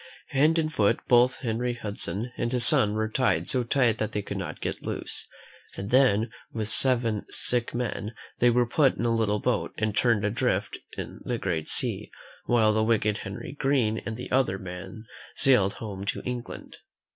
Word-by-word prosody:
Hand 150 +4 +3
and 155 -1 0
foot 110 -1 +2
both 125 +1 +4
Henry 120 0 -1
Hudson 110 0 -4
and 120 - -2
his 125 -2 +4
son 115 -9 +5
were 110 0 0
tied 125 +3 0
so 125 -2 +2
tight 120 -2 +2
that 110 - -2
they 105 - -2
could - - -6
not - - -5
get - - -4
loose, - - -3 0.5
and 100 +1 -5
then, 120 -4 +3 0.2
with 110 -2 -3
seven 115 -3 +2
sick 120 -1 0
men, 115 -2 -3 0.2
they 120 - +5
were 120 +1 +3
put 135 +3 +2
in 120 - -2
a 115 - +2
little 105 -2 +1
boat - - -1
and 110 -1 -1
turned 115 -4 +2
adrift 105 +2 -1 0.2
in - - -6
the 120 - -2
great 85 -7 -3
sea, - - 0 0.4
while 110 -3 +3
the 110 - +1
wicked 110 -2 +1
Henry 95 0 -7
Green 125 -6 +1
and 110 0 -6
the 125 - -8
other 130 -7 +2
men 95 +4 -8 0.3
sailed 105 -8 +4
home 100 -3 -7
to - - -3
England. 125 -1 -6
115 Hz, 180 wpm, -26 LUFS, 105-125 Hz, 0.5 s, son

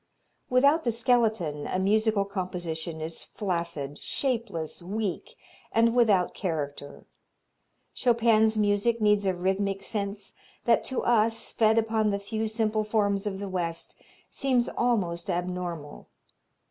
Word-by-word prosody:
Without 280 +6 +4
the 235 - +1
skeleton 220 -10 +1
a - - -1
musical 210 +1 +2
composition 175 -4 -4
is 160 +1 -4
flaccid, 170 -7 -4
shapeless, 230 - -3
weak 210 - -4 0.4
and 230 +1 +3
without 215 -7 +3
character. 145 -5 -4 0.9
Chopin's 225 -2 +3
music 210 +3 +2
needs 210 -2 +3
a 185 - +1
rhythmic 195 +2 -1
sense 200 -2 -3 0.3
that 235 -1 +4
to 260 - -2
us, 225 -1 +2
fed 220 0 +3
upon 220 -1 +2
the 200 - 0
few 215 +2 -3
simple 215 -1 0
forms 205 -2 0
of 195 -2 -3
the 200 0 -5
West, 170 -3 -3 0.3
seems 255 -3 +1
almost 200 -7 0
abnormal. 175 -4 -4
205 Hz, 120 wpm, -27 LUFS, 180-225 Hz, 0.9 s, Without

